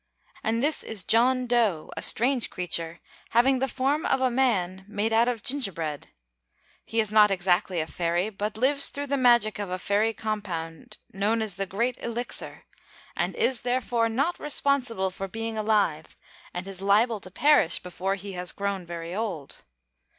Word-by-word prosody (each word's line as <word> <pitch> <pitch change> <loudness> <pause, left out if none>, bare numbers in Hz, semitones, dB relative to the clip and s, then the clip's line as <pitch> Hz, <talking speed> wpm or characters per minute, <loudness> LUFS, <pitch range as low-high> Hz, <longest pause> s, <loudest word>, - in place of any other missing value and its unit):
And 230 +2 0
this 300 +1 +2
is 215 -4 -2
John 250 +4 +3
Dough, 225 -10 +1
a - - -5
strange 245 +1 +3
creature, 170 -2 -3 0.4
having 260 +2 +4
the 270 - +1
form 275 +4 0
of - - +2
a 260 -1 +1
man, 195 -8 0
made 215 +1 -1
out 230 +2 +4
of 240 -4 -2
gingerbread. 175 - -3 0.8
He 225 - -2
is 215 -2 +2
not 210 -1 +6
exactly 185 -1 +1
a 155 - -1
fairy, 175 +5 -1
but 210 +1 -4
lives 280 +4 +4
through 285 0 -4
the 280 0 -1
magic 240 -5 +4
of 205 -2 -4
a 185 - -2
fairy 205 +4 +1
compound 190 -8 -5 0.2
known 210 +4 +1
as 215 -3 0
the 195 +1 -3
'Great 235 +6 -1
Elixir,' 235 +1 -3 0.5
and - - -1
is 265 - +1
therefore 245 -2 0
not 280 +10 -1
responsible 255 -9 0
for 195 +1 -5
being 225 +3 -4
alive 210 -8 0 0.3
and 180 +2 -6
is 195 -1 -5
liable 210 +3 +3
to 185 - -9
perish 280 - +4
before 185 +2 -3
he 200 0 -8
has 180 -1 -2
grown 200 -3 -3
very 170 0 -6
old. 190 -9 -5
215 Hz, 170 wpm, -26 LUFS, 185-245 Hz, 0.8 s, not